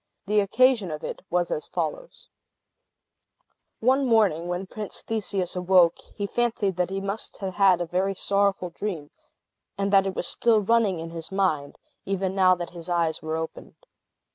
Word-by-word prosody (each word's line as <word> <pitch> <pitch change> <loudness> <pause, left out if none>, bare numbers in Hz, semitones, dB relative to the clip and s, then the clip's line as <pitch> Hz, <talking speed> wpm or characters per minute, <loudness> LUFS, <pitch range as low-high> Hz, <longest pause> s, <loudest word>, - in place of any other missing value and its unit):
The 210 +1 +2
occasion 225 0 +3
of 155 0 -6
it - - -5
was 175 0 0
as 155 - -3
follows: - - -5 1.5
One 260 +3 +3
morning, 200 -8 +3
when 180 +2 -3
Prince 210 +1 -6
Theseus 200 -5 -2
awoke, 180 -2 +4 0.2
he 205 - -2
fancied 220 -3 0
that 180 0 0
he 195 0 -3
must 200 +2 -4
have 190 -2 -4
had 190 -2 +4
a - - 0
very 185 +3 -1
sorrowful 195 -2 +1
dream, 170 -6 -5 0.7
and 200 0 -1
that 195 0 +5
it 190 - -3
was - - -1
still 230 +3 +3
running 210 -3 +2
in 165 0 -6
his 165 +1 -6
mind, 180 -8 0 0.3
even 190 -1 -2
now 185 -1 +5
that 175 -1 -6
his 170 0 -9
eyes 170 -2 0
were 160 0 -3
opened. 160 0 -7
190 Hz, 165 wpm, -25 LUFS, 175-205 Hz, 1.5 s, that